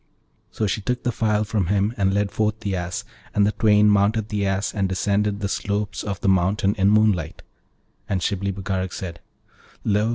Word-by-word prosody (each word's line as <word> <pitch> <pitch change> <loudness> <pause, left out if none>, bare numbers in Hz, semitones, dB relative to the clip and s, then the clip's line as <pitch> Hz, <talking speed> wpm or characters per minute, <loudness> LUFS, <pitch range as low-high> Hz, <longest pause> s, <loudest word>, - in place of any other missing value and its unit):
So 110 - -2
she 105 +1 -1
took 125 +4 -2
the 125 - +1
phial 110 -2 +1
from 105 -4 -1
him 100 +3 +1
and 95 -2 +1
led 100 0 0
forth 110 0 -1
the 100 -3 -2
Ass, 90 0 -3 0.3
and 100 - +4
the 105 - +2
twain 105 -1 +4
mounted 105 +1 +2
the 100 -2 -1
Ass 95 +1 -1
and 100 -3 0
descended 100 +2 0
the 100 - 0
slopes 100 +1 -2
of 100 -2 -4
the - - -1
mountain 95 +2 +2
in 100 -2 +2
moonlight; 105 -7 +2 0.7
and 95 - +1
Shibli 100 +1 -1
Bagarag 95 -1 -3
said, 85 -3 -6 0.6
'Lo! 105 +1 +2
100 Hz, 190 wpm, -23 LUFS, 95-105 Hz, 0.7 s, and